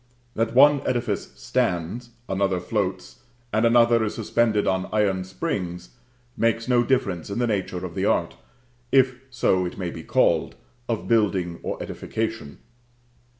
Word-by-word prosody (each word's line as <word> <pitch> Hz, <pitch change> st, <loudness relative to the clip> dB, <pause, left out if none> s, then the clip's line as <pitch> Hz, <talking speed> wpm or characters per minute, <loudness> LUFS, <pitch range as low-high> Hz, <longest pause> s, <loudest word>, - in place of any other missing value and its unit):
That 115 Hz, +1 st, -1 dB
one 145 Hz, +1 st, +7 dB
edifice 120 Hz, -2 st, -1 dB
stands, 90 Hz, +8 st, -1 dB, 0.2 s
another 95 Hz, -1 st, 0 dB
floats, 95 Hz, 0 st, -3 dB, 0.4 s
and 110 Hz, +2 st, +3 dB
another 115 Hz, -1 st, +4 dB
is 105 Hz, -, -2 dB
suspended 110 Hz, -1 st, +1 dB
on 95 Hz, 0 st, 0 dB
iron 100 Hz, -3 st, +1 dB
springs, 90 Hz, -, -4 dB, 0.5 s
makes 115 Hz, +1 st, 0 dB
no 120 Hz, -1 st, +4 dB
difference 105 Hz, -10 st, 0 dB
in 100 Hz, -, -4 dB
the 120 Hz, -, +1 dB
nature 105 Hz, -5 st, -2 dB
of -, -, -7 dB
the -, -, -1 dB
art, -, -, +1 dB, 0.6 s
if 130 Hz, -2 st, +3 dB
so 110 Hz, -7 st, +1 dB
it 90 Hz, -, -5 dB
may 90 Hz, -3 st, -3 dB
be 80 Hz, -, -8 dB
called, -, -, +1 dB, 0.3 s
of 115 Hz, -2 st, -2 dB
building 95 Hz, -7 st, +1 dB
or -, -, -4 dB
edification. 110 Hz, -9 st, -4 dB
110 Hz, 145 wpm, -24 LUFS, 95-120 Hz, 0.6 s, one